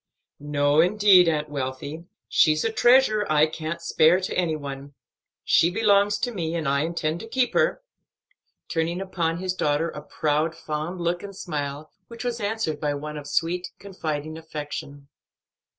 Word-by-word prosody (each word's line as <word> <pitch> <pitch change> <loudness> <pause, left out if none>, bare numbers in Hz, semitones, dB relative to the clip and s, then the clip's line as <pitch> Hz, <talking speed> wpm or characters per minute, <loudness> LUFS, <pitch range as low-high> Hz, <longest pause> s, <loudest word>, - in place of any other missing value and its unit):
"No, 145 0 +1
indeed, 190 -1 +5
Aunt 150 -1 -1
Wealthy; 140 +3 -5 0.2
she's 155 +2 +3
a 225 - +1
treasure 240 -2 +4
I 155 0 +5
can't 160 +1 -5
spare 170 +1 +4
to 185 - -3
any 170 -3 +1
one. 140 -1 -8 0.5
She 170 - +4
belongs 205 0 +3
to 245 - 0
me, 170 -6 -3
and 160 -4 -2
I 140 +1 +2
intend 160 +1 -1
to 225 - -8
keep 250 +1 0
her," - - +1 0.8
turning 165 +2 -1
upon 170 -4 -2
his 185 +1 -2
daughter 155 -1 0
a 150 - -8
proud, 155 +2 -1
fond 155 +4 -4
look 170 +1 -1
and 200 -1 -9
smile, 150 -3 -5 0.2
which 235 0 -8
was 240 -1 -2
answered 205 -7 -2
by 145 -1 0
one 150 +1 -6
of 145 -1 -7
sweet, 175 +4 -1
confiding 155 -5 -5
affection. 145 -3 -7
165 Hz, 160 wpm, -24 LUFS, 150-190 Hz, 0.8 s, indeed